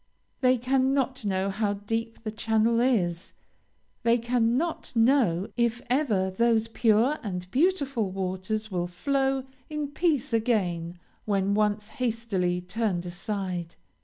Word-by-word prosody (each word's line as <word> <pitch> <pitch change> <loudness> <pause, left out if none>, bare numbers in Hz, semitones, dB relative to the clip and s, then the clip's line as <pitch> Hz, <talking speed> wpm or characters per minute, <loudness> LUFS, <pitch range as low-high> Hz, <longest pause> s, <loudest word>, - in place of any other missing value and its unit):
They 255 -1 +4
cannot 265 0 +1
know 195 0 0
how 205 0 0
deep 225 +3 -4
the 215 - -3
channel 220 +1 +2
is 185 -9 +1 0.7
they 235 0 +4
cannot 245 +7 0
know 225 -7 +3
if 235 -1 +1
ever 220 -9 +1
those 225 +2 +2
pure 230 +5 +2
and 180 -4 -4
beautiful 275 - +1
waters 190 +3 -3
will 175 -1 -1
flow 270 +7 0 0.3
in 300 -2 -3
peace 295 -5 0
again 180 -7 0 0.3
when 200 -1 +1
once 210 0 +1
hastily 225 -9 -1
turned 185 -2 -2
aside. 180 -1 -4
225 Hz, 120 wpm, -27 LUFS, 190-250 Hz, 0.7 s, They